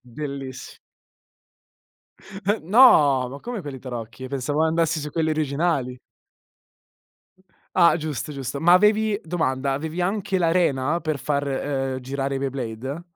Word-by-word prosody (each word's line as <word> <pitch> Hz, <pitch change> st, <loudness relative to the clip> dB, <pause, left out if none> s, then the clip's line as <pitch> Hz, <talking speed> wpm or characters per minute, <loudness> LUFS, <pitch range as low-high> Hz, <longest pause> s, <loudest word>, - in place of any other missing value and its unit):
Bellissi 135 Hz, 0 st, -7 dB, 1.7 s
Uh, 205 Hz, +3 st, +1 dB
no! 155 Hz, -, +6 dB
Ma 140 Hz, +2 st, -9 dB
come, 240 Hz, -4 st, -5 dB
per 145 Hz, -4 st, -7 dB
i -, -, -8 dB
tarocchi? 120 Hz, -1 st, -7 dB
Pensavo 145 Hz, +3 st, -1 dB
andassi 165 Hz, 0 st, +1 dB
su 150 Hz, 0 st, -5 dB
quelli 160 Hz, +1 st, 0 dB
originali. 145 Hz, -4 st, -1 dB, 1.8 s
Ah, 170 Hz, -2 st, +5 dB
giusto, 150 Hz, -2 st, -4 dB
giusto. 135 Hz, 0 st, -5 dB
Ma 175 Hz, +2 st, +5 dB
avevi 210 Hz, +2 st, +4 dB
domanda: 140 Hz, -5 st, -1 dB
avevi 160 Hz, +4 st, -4 dB
anche 190 Hz, +1 st, -1 dB
l'arena 165 Hz, -3 st, +1 dB
per 155 Hz, -3 st, -2 dB
far, 145 Hz, -1 st, -1 dB, 0.5 s
uhm, -, -, -6 dB
girare 135 Hz, +1 st, -3 dB
i -, -, -1 dB
Beyblade? 135 Hz, +2 st, -4 dB
150 Hz, 130 wpm, -23 LUFS, 135-170 Hz, 1.8 s, no